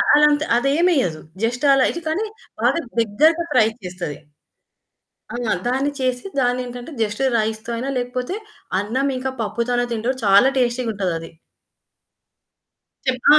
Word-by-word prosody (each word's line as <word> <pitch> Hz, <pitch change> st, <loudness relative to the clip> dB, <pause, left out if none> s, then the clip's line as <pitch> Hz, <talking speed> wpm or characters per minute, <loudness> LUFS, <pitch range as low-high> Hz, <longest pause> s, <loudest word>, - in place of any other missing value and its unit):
అలాంత 295 Hz, 0 st, +5 dB
అదేమేయదు. 275 Hz, -, +2 dB, 0.2 s
Just 240 Hz, +4 st, -1 dB
అలా 270 Hz, -1 st, +4 dB
అయితే 340 Hz, -, -3 dB
కానీ 385 Hz, +8 st, 0 dB, 0.4 s
బాగా -, -, +3 dB, 0.2 s
దగ్గరగా 310 Hz, +11 st, +3 dB
ఫ్రై 220 Hz, -3 st, +5 dB, 0.2 s
చేస్తది. 180 Hz, -5 st, -5 dB, 1.2 s
ఆ! -, -, -2 dB, 0.3 s
దాన్ని 270 Hz, +3 st, +1 dB
చేసి 255 Hz, -1 st, -1 dB, 0.2 s
దాన్నేంటంటే 245 Hz, +2 st, -2 dB
జస్ట్ 210 Hz, +4 st, -2 dB
రైస్‌తొ 220 Hz, +1 st, -2 dB
అయినా 265 Hz, +4 st, -2 dB
లేకపోతే, 250 Hz, +8 st, -3 dB, 0.4 s
అన్నం 260 Hz, +7 st, 0 dB
ఇంకా 260 Hz, +1 st, -2 dB
పప్పుతోనే 245 Hz, +3 st, 0 dB
తింటప్పుడు, 240 Hz, +4 st, -1 dB
చాలా 200 Hz, +6 st, +6 dB
టేస్టీగుంటదది. 215 Hz, -9 st, -1 dB, 1.8 s
చెప్పా 255 Hz, +2 st, +3 dB
245 Hz, 110 wpm, -21 LUFS, 220-270 Hz, 1.8 s, చాలా